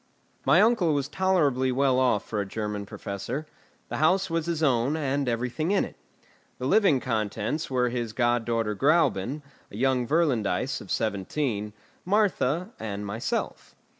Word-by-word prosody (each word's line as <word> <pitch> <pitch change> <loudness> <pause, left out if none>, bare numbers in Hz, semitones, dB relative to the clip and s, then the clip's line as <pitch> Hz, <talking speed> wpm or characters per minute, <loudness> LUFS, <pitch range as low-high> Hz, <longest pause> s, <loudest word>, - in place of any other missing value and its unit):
My 170 +9 +6
uncle 205 -9 +3
was 140 -1 -1
tolerably 150 -7 +1
well 130 0 +2
off 125 -5 +2
for 105 -2 -2
a - - -3
German 105 -1 -4
professor. 105 +12 -5 0.4
The - - -3
house 185 +4 +2
was 165 0 -1
his 165 -2 -1
own, 135 +1 +2
and 140 -3 -1
everything 125 +7 -1
in 200 0 +2
it. - - -11 0.6
The 130 - -5
living 175 -3 +4
contents 110 +5 -2
were 125 -2 +1
his 120 -2 -3
god 120 0 +1
daughter 115 -2 -1
Gräuben, 145 - +2 0.3
a 100 - -9
young 130 0 +1
Virlandaise 145 -8 +1
of - - -12
seventeen, 105 +1 -2 0.3
Martha, 185 - +1
and 105 -2 -4
myself. 110 +3 -4
130 Hz, 150 wpm, -26 LUFS, 115-155 Hz, 0.6 s, My